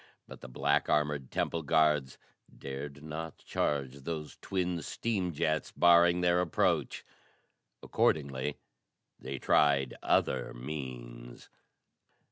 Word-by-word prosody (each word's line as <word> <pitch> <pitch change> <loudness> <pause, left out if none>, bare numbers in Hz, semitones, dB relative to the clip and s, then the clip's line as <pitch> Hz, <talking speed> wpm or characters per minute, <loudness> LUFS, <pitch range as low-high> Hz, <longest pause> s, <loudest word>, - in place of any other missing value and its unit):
But - - -11
the - - -8
black 70 +3 +1
armored 75 -3 +1
temple 85 - -1
guards 75 -3 +2 0.4
dared 70 +1 -7
not 80 +1 -6
charge 70 -2 -2
those 75 +2 -6
twin 90 -3 -2
steam 100 -4 -2
jets 80 0 -1
barring 85 0 +5
their 90 0 +3
approach. 85 -3 0 0.8
Accordingly 70 -1 0 0.6
they 65 +1 -5
tried 70 -1 +3
other 65 -1 +1
means. - - -8
75 Hz, 100 wpm, -31 LUFS, 65-80 Hz, 0.8 s, barring